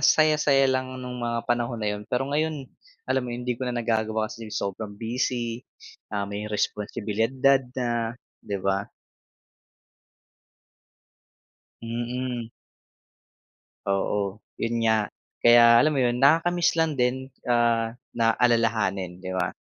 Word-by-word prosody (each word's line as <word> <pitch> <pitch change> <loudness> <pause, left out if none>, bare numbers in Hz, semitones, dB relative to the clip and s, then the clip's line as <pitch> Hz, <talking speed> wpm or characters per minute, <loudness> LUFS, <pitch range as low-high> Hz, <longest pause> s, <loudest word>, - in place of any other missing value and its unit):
saya 155 -1 +5
saya 135 -2 +4
lang 130 -1 0
nung 125 -1 -6
mga 115 -1 -2
panahon 120 0 0
na 105 -2 -2
yun 105 +1 -7
pero 125 +2 0
ngayon 150 0 -1 0.4
alam 130 - +1
mo 125 - -6
yun 120 +1 -5
hindi 125 - 0
ko 125 +1 -4
na 125 - -3
nagagawa 110 -2 0
kasi 115 -1 -9
sobrang 100 0 -4
busy 120 +1 -2 0.5
ah 100 -1 -2
may 100 +1 -5
responsibilidad 105 +1 -1 0.5
na 120 -2 -1 0.2
di 100 - -4
ba? 95 0 0 3.0
Mm. 120 0 -4 1.4
Oo, 100 +1 -1 0.2
yun 115 0 0
nga 110 -2 +2 0.3
kaya 120 0 +8
alam 155 - +3
mo 145 - -1
yun 120 -2 +2
nakaka-miss 165 +4 +4
lang 160 -2 +2
din 130 0 0 0.2
ah 115 -1 +3 0.2
na 115 -1 +3
alalahanin, 110 -7 +1
di 95 0 -6
ba? 90 -1 0
120 Hz, 130 wpm, -25 LUFS, 110-125 Hz, 3.0 s, kaya